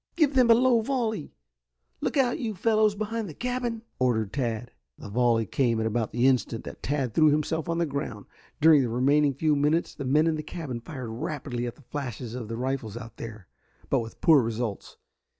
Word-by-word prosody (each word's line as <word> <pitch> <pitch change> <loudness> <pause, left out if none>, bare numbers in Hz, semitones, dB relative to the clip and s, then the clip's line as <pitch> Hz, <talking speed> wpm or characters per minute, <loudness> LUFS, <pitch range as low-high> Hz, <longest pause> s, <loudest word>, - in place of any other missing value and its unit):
"Give 305 -4 +3
them 255 -3 +4
a 230 - +9
low 245 -1 +4
volley. 220 - -2 0.7
Look - - -1
out, 255 +1 +2
you 225 -6 -3
fellows 215 +1 +2
behind 215 0 -3
the 155 - -9
cabin," 245 -2 -3 0.2
ordered 110 -5 +1
Tad. 120 -3 -2 0.3
The - - -9
volley 115 0 +2
came 115 +1 +1
at 110 - 0
about 110 0 -1
the 120 +2 +1
instant 125 -3 +1
that - - -9
Tad 135 -5 -1
threw 155 -1 +5
himself 155 +2 0
on 165 - 0
the 170 - +2
ground. 140 -8 -4 0.3
During 155 -2 +7
the 125 - -1
remaining 140 +4 +3
few 155 +2 +2
minutes 150 +4 +1
the 140 - -6
men 150 +4 +3
in 160 -1 +1
the - - -3
cabin 150 -7 -6
fired 125 -2 -7
rapidly 120 0 -4
at 120 - -6
the 145 - -20
flashes 125 -3 -5
of 120 -3 -5
the 115 +1 -5
rifles 125 -4 -3
out 115 -2 -10
there, 110 -5 -8 0.4
but 135 - +4
with 115 -1 -8
poor 155 -4 +6
results. 115 -2 -4
140 Hz, 205 wpm, -27 LUFS, 120-170 Hz, 0.7 s, a